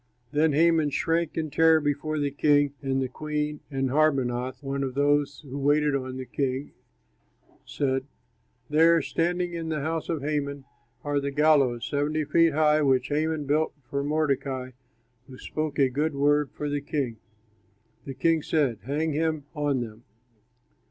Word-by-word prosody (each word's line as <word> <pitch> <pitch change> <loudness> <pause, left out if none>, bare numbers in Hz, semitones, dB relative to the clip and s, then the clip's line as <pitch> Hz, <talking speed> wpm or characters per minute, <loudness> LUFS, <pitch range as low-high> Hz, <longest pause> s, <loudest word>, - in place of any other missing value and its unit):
Then 150 0 +2
Haman 160 0 +3
shrank 165 +3 -1
in 155 -2 -2
terror 160 +1 +5
before 150 +1 -2
the 145 -1 0
king 145 0 +3
and 135 -1 -1
the - - -2
queen, 150 +2 -3
and 135 -2 -1
Harbonah, 130 -4 +1
one 140 -1 -3
of 130 -1 -4
those 145 0 +1
who 140 -2 -7
waited 145 +1 +2
on 130 -1 -4
the 130 - -5
king, 130 +2 -2 1.0
said, 135 -1 -1 0.6
"There, 165 +1 +4
standing 175 +3 -1
in 165 -1 -4
the 155 -2 -2
house 160 +2 -3
of 160 -5 -2
Haman, 140 -2 -2 0.4
are 145 -1 0
the 140 0 -2
gallows, 140 -5 +3
seventy 150 +2 -1
five 150 - -12
feet 165 -1 +4
high, 155 0 +3
which 130 -2 +2
Haman 155 0 -1
built 150 +3 0 0.2
for 140 0 -1
Mordecai, 140 -3 -1 0.6
who 130 -2 -11
spoke 155 +1 -4
a 135 - +4
good 145 +4 -1
word 145 0 +2
for 150 - -5
the 145 0 -2
king." 140 -5 -3 0.9
The 135 - -6
king 165 +1 +2
said, 145 -8 0
"Hang 150 +4 -1
him 155 -1 -1
on 145 -4 0
them." 115 -1 -8
145 Hz, 160 wpm, -26 LUFS, 135-155 Hz, 1.0 s, terror